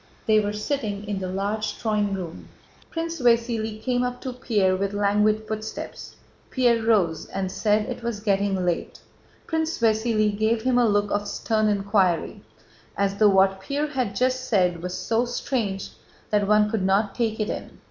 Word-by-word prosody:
They 215 -1 +5
were 205 -1 -1
sitting 210 -2 -3
in 205 -2 -2
the 185 -1 -4
large 205 +3 -2
drawing 210 -3 0
room. 175 -3 -7 0.4
Prince 330 -2 -4
Vasíli 230 -2 +1
came 250 -1 +1
up 250 0 -2
to 255 - -4
Pierre 205 -7 +1
with 200 +1 -2
languid 210 +1 +2
footsteps. 220 0 -6 0.3
Pierre 240 -3 +2
rose 185 -8 +1
and 190 -1 -3
said 210 +1 +1
it - - -5
was 235 -3 -3
getting 200 -3 0
late. 175 -1 -2 0.5
Prince 320 0 -1
Vasíli 220 -2 +2
gave 220 +2 +1
him 250 -1 +3
a 240 - +4
look 205 0 +1
of 205 0 -1
stern 215 +1 0
inquiry, 200 -4 +1 0.6
as 200 0 0
though 210 -1 +6
what 190 0 +3
Pierre 285 +8 -2
had 255 -8 -2
just 255 +3 0
said 180 -5 +2
was 180 +1 -4
so 230 +1 0
strange 230 -5 -2 0.4
that 205 -1 +2
one 210 0 +4
could 220 -3 0
not 195 +2 +2
take 225 -2 -1
it 215 - -1
in. - - -7
210 Hz, 170 wpm, -24 LUFS, 200-235 Hz, 0.6 s, though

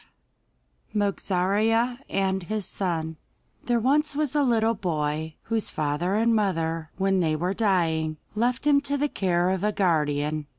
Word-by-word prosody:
') - - -42
MOGARZEA 210 +4 +1
AND 190 -1 0
HIS 215 +1 -2
SON 160 -5 -3 0.5
There 240 -1 +2
was 285 +5 +2
once 300 -3 0
a 295 - +2
little 230 -4 +2
boy, 155 -5 -2
whose 225 -1 -1
father 155 +6 -1
and 230 +2 +3
mother, 165 -6 0
when 195 0 +2
they 160 -3 +1
were 175 +5 -1
dying, 165 -7 +1 0.2
left 245 +5 0
him 285 -1 +5
to 285 0 -1
the 290 +1 +1
care 180 -4 +1
of 190 0 -2
a 210 - +2
guardian. 150 -5 0
190 Hz, 155 wpm, -25 LUFS, 160-225 Hz, 0.5 s, him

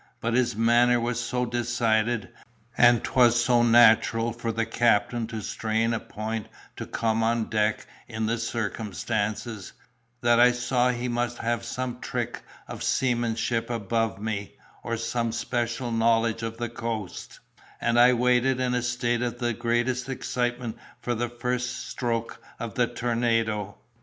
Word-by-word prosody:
But 115 0 -1
his 120 -2 +2
manner 120 +2 +4
was 120 0 -1
so 125 +1 -1
decided, 120 -2 0 0.5
and 120 -1 +5
'twas 120 -2 +4
so 120 -2 +4
natural 115 -1 +5
for 115 -1 -3
the 115 0 -1
captain 115 0 +1
to 110 -2 -5
strain 110 +2 -1
a 115 - -1
point 110 -1 -5 0.3
to - - -6
come 115 0 0
on 115 0 0
deck 105 0 +1 0.2
in 110 -2 -3
the 115 +1 -1
circumstances, 110 -1 -3 0.5
that 120 0 +4
I 125 0 +6
saw 125 +1 +1
he 125 0 -2
must 120 0 -1
have 120 0 -1
some 125 +1 -4
trick - - -4 0.3
of - - -8
seamanship 120 -2 0
above 115 -2 -1
me, 105 -2 -4 0.3
or 115 -1 -3
some 115 0 -1
special 120 +1 -2
knowledge 115 0 +2
of 115 0 -4
the 120 0 -2
coast; 115 -4 -5 0.4
and 120 0 +2
I 125 +1 +7
waited 125 +1 +2
in 125 -1 0
a 125 - +1
state 120 0 -1
of 120 -1 -2
the 120 -1 -1
greatest 120 +3 -1
excitement 120 -2 -2 0.2
for 120 - -2
the 120 +1 -2
first 125 0 -3
stroke 115 -2 -3 0.2
of 115 -3 -5
the 120 +2 +2
tornado. 115 -4 -1
120 Hz, 150 wpm, -26 LUFS, 115-120 Hz, 0.5 s, I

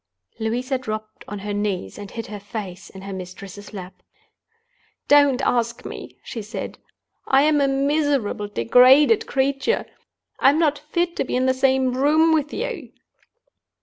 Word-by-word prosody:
Louisa 250 +4 -1
dropped 215 -3 -6
on 205 - -5
her 205 +1 -5
knees 205 - -3
and 205 -1 -8
hid 230 +1 -6
her 205 +1 -7
face 200 -3 -7
in 190 0 -11
her 195 0 -6
mistress's 190 +2 -9
lap. 190 -3 -9 1.1
"Don't 285 -2 +5
ask 235 -2 0
me!" - - -8
she 230 - -6
said. 215 +2 -7 0.5
"I'm 290 +2 +4
a 280 - +3
miserable, 275 -6 0
degraded 255 - +5
creature; 275 - 0 0.5
I'm 280 +3 +5
not 305 -3 +2
fit 345 +1 0
to - - +1
be - - -3
in 255 +1 +1
the 260 - +3
same 260 -1 +2
room 310 +4 +4
with 300 -2 0
you!" 420 - -5
255 Hz, 150 wpm, -22 LUFS, 205-285 Hz, 1.1 s, Don't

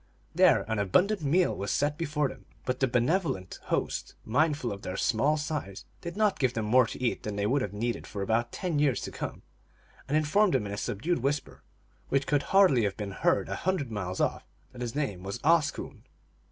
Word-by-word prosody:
Then - - +5
an 110 -2 -1
abundant 180 - +2
meal 170 +5 +2
was 100 - -4
set 145 0 +1
before 150 -3 0
them, - - -11 0.2
but 125 0 -1
the 135 - +3
benevolent 125 - 0
host, - - -2
mindful 145 +2 +1
of 100 -1 -6
their 95 +1 -5
small 125 +8 +2
size, 145 - -4 0.2
did 170 +2 -6
not 210 -2 +2
give 130 -3 +1
them 110 -1 -1
more 125 +2 +5
to - - -7
eat 125 -2 0
than 105 -1 -4
they 100 0 -1
would 135 +6 +2
have 100 - -2
needed 115 +3 -3
for 100 - -4
about 115 +3 0
ten 175 -6 -2
years 140 -6 +2
to - - -5
come, - - -6 0.6
and 145 +3 +2
informed 175 +6 +3
them 105 - +1
in 100 - -4
a - - -4
subdued 130 - -1
whisper, 140 +3 -2 0.5
which 140 0 +1
could 145 -1 +2
hardly 185 - +5
have 100 - -2
been 105 -2 -4
heard - - +1
a 100 - -3
hundred 175 -9 -1
miles 95 -3 -3
off, - - 0 0.3
that 125 -1 -10
his 120 0 -4
name 130 -12 -2
was 100 +4 -4
Oscoon. 160 -1 +1
130 Hz, 205 wpm, -29 LUFS, 105-155 Hz, 0.6 s, Then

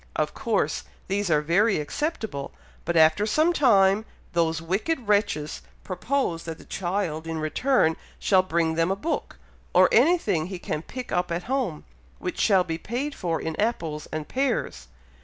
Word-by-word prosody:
Of - - 0
course 60 - -1 0.2
these 200 0 -1
are 150 -2 +3
very 195 +7 +3
acceptable, 180 - -3 0.3
but 170 - 0
after 160 +6 +5
some 310 +10 +3
time, 205 - +4 0.3
those 165 -2 +1
wicked 205 - -2
wretches 200 -8 +1 0.2
propose 185 -2 -1
that 165 -1 -5
the - - -15
child 175 -4 -2
in 165 0 -3
return 160 - +2 0.2
shall 190 -2 +4
bring 170 -3 0
them 165 +2 +1
a 195 - +1
book, 315 +12 -3 0.4
or - - +7
anything 205 - +3
he 185 -1 -5
can 155 -3 -3
pick 250 +8 -8
up 180 -1 0
at 170 +1 -2
home, 240 - -2 0.3
which 180 - -5
shall 195 -4 +4
be 165 -2 -4
paid 265 +7 -3
for 170 -8 -2
in 160 -1 -3
apples 165 -9 -2
and 155 -1 -4
pears. 240 - -1
185 Hz, 160 wpm, -25 LUFS, 160-220 Hz, 0.4 s, or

